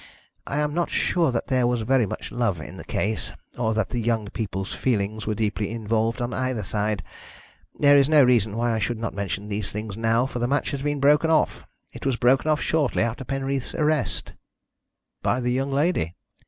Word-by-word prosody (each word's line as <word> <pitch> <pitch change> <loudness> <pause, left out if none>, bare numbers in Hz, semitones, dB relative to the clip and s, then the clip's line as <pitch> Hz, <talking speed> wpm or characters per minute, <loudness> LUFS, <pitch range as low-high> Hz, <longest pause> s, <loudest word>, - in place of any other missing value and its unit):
I 140 - -2
am 150 0 0
not 175 +1 0
sure 170 -4 +2
that 120 - -1
there 125 -2 +2
was 120 -2 0
very 125 -1 +3
much - - -6
love 115 -8 0
in 80 - -9
the - - -8
case, 110 +2 -2 0.2
or 110 -2 0
that 110 -3 0
the 120 - -2
young 115 -1 0
people's 95 -4 -4
feelings 110 -3 -1
were 110 - 0
deeply 105 -1 -1
involved 115 +2 -1
on 120 0 -3
either 130 -4 -1
side. 105 0 -1 0.7
There 145 -1 +6
is 140 0 +5
no 150 -2 +7
reason 115 -4 +3
why 120 0 +1
I 110 - 0
should 120 +2 -1
not 115 0 -3
mention 100 +1 -3
these 105 -2 -3
things 105 -1 -5
now, 115 +2 +2
for 130 -2 -4
the 120 - +1
match 140 +3 0
has 140 - -3
been 145 0 -1
broken 150 +3 +4
off. 160 -1 +1 0.3
It - - -9
was 135 -2 +1
broken 130 +5 +3
off 155 -1 +2
shortly 150 -8 +1
after 115 +3 -2
Penreath's 135 0 -3
arrest." 150 -3 0 0.9
"By 125 - +1
the 125 -1 0
young 135 +2 0
lady?" 140 - +1
120 Hz, 205 wpm, -24 LUFS, 110-135 Hz, 0.9 s, no